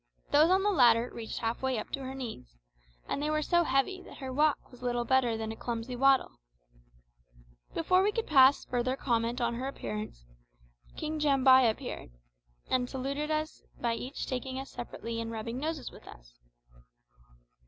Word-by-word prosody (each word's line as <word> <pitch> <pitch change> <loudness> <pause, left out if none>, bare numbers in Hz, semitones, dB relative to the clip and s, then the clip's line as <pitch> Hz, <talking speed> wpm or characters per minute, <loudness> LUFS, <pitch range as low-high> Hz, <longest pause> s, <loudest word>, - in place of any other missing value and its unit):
Those 300 +3 +6
on 380 +1 +4
the 415 - +3
latter 240 - +4
reached 225 -1 -6
half 225 0 -2
way 265 -2 0
up 215 - -5
to - - -2
her 265 0 -6
knees, 220 - -8 0.5
and - - -2
they 300 - 0
were 305 0 +1
so 345 +3 +3
heavy 310 +7 0
that - - -13
her 260 -1 -6
walk 295 +1 +1
was 250 - -15
little 240 -1 -1
better 245 -3 +2
than 220 0 -4
a - - -6
clumsy 235 +2 -4
waddle. 270 +1 +3 1.4
Before 365 +3 +3
we 410 +2 +2
could 455 +1 -2
pass 270 -2 +6
further 250 +1 -1
comment 235 -2 0
on 235 -1 0
her 250 +3 -3
appearance, 105 - -6 0.7
King 310 0 -3
Jambai 265 -3 +5
entered, 220 - -2 0.6
and 250 -1 0
saluted 275 +3 -3
us 310 0 -2 0.2
by 235 -1 0 0.3
taking 260 0 -4
us 270 +1 -6
each - - -20
separately 230 -1 -5
and 225 - -4
rubbing 230 +2 -4
noses 310 -2 -3
with - - -15
us. - - -14
260 Hz, 175 wpm, -30 LUFS, 235-290 Hz, 1.4 s, Those